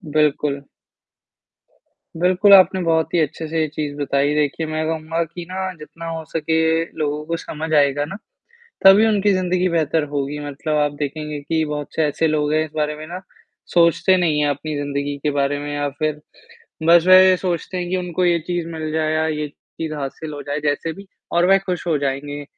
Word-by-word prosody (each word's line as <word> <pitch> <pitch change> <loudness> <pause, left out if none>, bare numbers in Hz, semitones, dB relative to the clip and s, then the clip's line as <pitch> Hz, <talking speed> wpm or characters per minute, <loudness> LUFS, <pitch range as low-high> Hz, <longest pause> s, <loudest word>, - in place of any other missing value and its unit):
बिल्कुल। 145 -2 +1 1.5
बिल्कुल, 185 +4 +4
आपने 190 -1 +6
बहुत 165 -2 +1
ही 175 - +3
अच्छे 160 +1 -2
से 160 +1 -2
ये 155 - +1
चीज़ 150 -1 -4
बताई, 145 0 +1
देखिए 150 +2 0
मैं 155 0 -2
कहूँगा 165 +1 -2
कि 170 +1 -9
ना 190 0 -3
जितना 165 +2 -10
हो 160 -1 -5
सके 160 +1 -1 0.4
लोगों 150 0 -1
को 165 +1 -2
समझ 160 0 -6
आएगा 145 -1 +3
ना, 165 - -7 0.7
तभी 195 +3 +8
उनकी 205 -2 +2
ज़िंदगी 185 0 +1
बेहतर 160 -2 +1
होगी 145 +1 -2
मतलब 150 +2 -2
आप 145 -1 +2
देखेंगे 150 +1 -4
कि 160 +2 -1
बहुत 150 -1 -4
से 160 - +2
ऐसे 155 +2 0
लोग 150 -1 0
हैं 155 0 +2
इस 155 - -13
बारे 150 -1 -1
में 155 +1 -9
ना, 180 +2 -7 0.5
सोचते 170 +2 +4
नहीं 165 -4 +1
हैं 145 - +2
अपनी 145 +2 -3
ज़िंदगी 145 0 -3
के 150 - +1
बारे 140 0 0
में 145 0 -5
या 145 0 -1
फिर, 150 +2 -3 0.6
बस 170 +2 +5
वह 185 - +8
ये 185 -1 +5
सोचते 180 0 -3
हैं 175 -1 -3
कि 185 - 0
उनको 180 0 -1
ये 175 -1 +3
चीज़ 175 -2 -2
मिल 155 -1 -4
जाए 155 0 0
या 155 0 +1
ये 150 -1 -2
चीज़ 155 +2 -8
हासिल 150 +2 -6
हो 145 -1 -6
जाए 145 +2 -3
जैसे 150 +2 -1
भी 195 +4 -12 0.3
और 170 +1 +3
वह 195 - +6
खुश 180 -2 -3
हो 160 - +2
जाएँगे। 145 +1 -3
155 Hz, 200 wpm, -20 LUFS, 145-170 Hz, 1.5 s, तभी